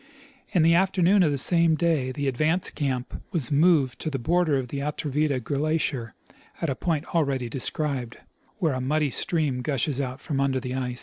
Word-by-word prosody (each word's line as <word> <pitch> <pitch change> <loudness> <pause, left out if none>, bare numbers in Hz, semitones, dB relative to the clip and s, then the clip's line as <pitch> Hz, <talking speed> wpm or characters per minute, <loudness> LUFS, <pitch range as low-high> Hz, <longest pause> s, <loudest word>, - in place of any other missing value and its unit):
In 175 - +2
the 165 +1 +5
afternoon 190 +2 +3
of 165 - +4
the 145 - -1
same 165 +3 +3
day 155 -6 +1
the 145 +1 -3
advance 155 +7 +1
caiiip 130 -4 -3
was 155 -10 -2
moved 145 -3 +3
to 155 - -3
the 140 - -2
border 160 +3 +1
of 130 -2 -3
the 140 - -4
Atrevida 150 -1 -1
glacier 140 -4 -1 0.4
at 165 - -1
a - - -2
point 160 -1 -2
already 140 -7 0
described, 130 -1 -2 0.4
where 165 -8 +1
a 130 - -2
muddy 150 +2 0
stream 150 -6 0
gushes 140 0 0
out 130 0 -4
from 145 -5 -3
under 135 -1 +1
the 125 0 -5
ice. 125 -2 -2
145 Hz, 185 wpm, -25 LUFS, 130-160 Hz, 0.4 s, the